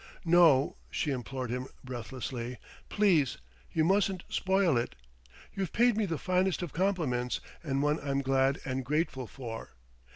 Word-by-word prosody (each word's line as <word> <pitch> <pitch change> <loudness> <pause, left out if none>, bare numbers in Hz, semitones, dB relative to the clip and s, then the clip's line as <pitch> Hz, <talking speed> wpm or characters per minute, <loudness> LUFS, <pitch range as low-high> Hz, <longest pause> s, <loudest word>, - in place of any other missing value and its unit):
"No!" 165 -5 +5
she 150 - -1
implored 130 -1 -4
him 125 +1 -3 0.2
breathlessly 125 0 -5 0.3
"please 175 - +3 0.3
you 160 - +2
mustn't 190 +1 +2
spoil 190 -5 +2
it! 120 +1 -1 0.6
You've 195 -3 -3
paid 240 -1 +4
me 215 -2 +1
the 165 -3 -1
finest 185 0 +1
of 170 - -5
compliments, 160 -10 0 0.2
and 140 -3 -1
one 150 +1 +2
I'm 140 -1 -1
glad 135 0 +2
and 130 0 -2
grateful 135 -2 -1
for 115 - -8
145 Hz, 140 wpm, -30 LUFS, 130-180 Hz, 0.6 s, No